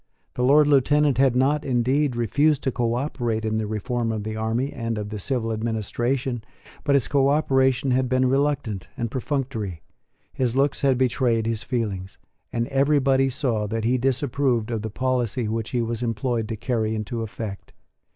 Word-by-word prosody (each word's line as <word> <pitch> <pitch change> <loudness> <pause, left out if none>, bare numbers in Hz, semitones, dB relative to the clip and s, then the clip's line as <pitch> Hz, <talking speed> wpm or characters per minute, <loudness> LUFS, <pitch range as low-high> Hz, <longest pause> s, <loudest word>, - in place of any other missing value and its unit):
The 125 - -2
Lord 145 +4 +6
Lieutenant 145 -1 +3
had 135 -2 +4
not, 140 +4 +2
indeed, 130 +2 +1
refused 145 +5 +2
to 130 - +1
cooperate 120 -2 -1
in 110 0 0
the 110 - -2
reform 115 +2 -2
of 110 -2 -3
the 110 +1 -4
army 110 +5 -1
and 115 -2 -3
of 105 -1 -4
the 105 -1 -5
civil 115 +1 -1
administration; 120 +3 -2 0.4
but 140 - +3
his 130 -7 +2
cooperation 135 -2 +2
had 130 0 +1
been 130 0 +2
reluctant 135 -7 0
and 115 -2 -3
perfunctory: 125 - -3 0.5
his 125 -2 -1
looks 140 +1 +1
had 135 -2 +3
betrayed 120 -3 +1
his 115 -1 -1
feelings; 105 -7 -3 0.3
and 115 0 -1
everybody 135 -1 +3
saw 120 -5 -1
that 115 +1 -2
he 125 +3 +2
disapproved 130 -2 0
of 115 -2 -2
the 110 - -4
policy 125 -1 -1
which 110 0 -2
he 120 -2 0
was 115 0 -3
employed 115 -1 -1
to 115 - -3
carry 110 -1 -1
into 110 +2 -3
effect. 110 -2 -6
120 Hz, 170 wpm, -24 LUFS, 110-135 Hz, 0.5 s, Lord